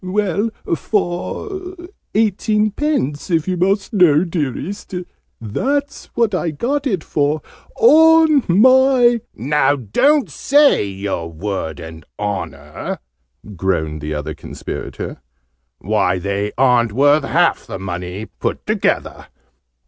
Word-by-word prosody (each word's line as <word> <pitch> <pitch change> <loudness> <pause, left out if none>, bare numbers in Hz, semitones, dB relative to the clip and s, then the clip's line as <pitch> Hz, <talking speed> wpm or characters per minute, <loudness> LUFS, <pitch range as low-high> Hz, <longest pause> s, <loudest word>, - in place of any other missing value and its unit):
"Well, 200 +2 0 0.3
for 360 - -3 0.4
eighteenpence, 215 - 0
if 165 -2 +1
you 185 - 0
must 195 +5 0
know, 175 -6 +5
dearest! 170 - -4 0.4
That's 275 - -2
what 230 -3 +1
I 180 -2 0
got 270 - -2
it 190 -10 -1
for, 150 +1 -1 0.3
on 320 - +6
my 245 +4 +5
" - - -51
"Now 145 +3 +2
don't 260 - +2
say 285 - +3
your 95 -4 -4
Word 85 -3 -4
and 80 -1 -10
Honour!" 80 -8 -4 0.6
groaned 80 -4 -1
the 75 +1 -4
other 75 +1 -4
Conspirator. 70 - -7 0.6
"Why, 95 -2 0
they 100 +2 -2
aren't 120 -4 +3
worth 145 +4 +4
half 170 +4 +1
the - - -5
money, 90 +2 -5
put - - -5
together!" - - -1
155 Hz, 110 wpm, -18 LUFS, -, 0.6 s, on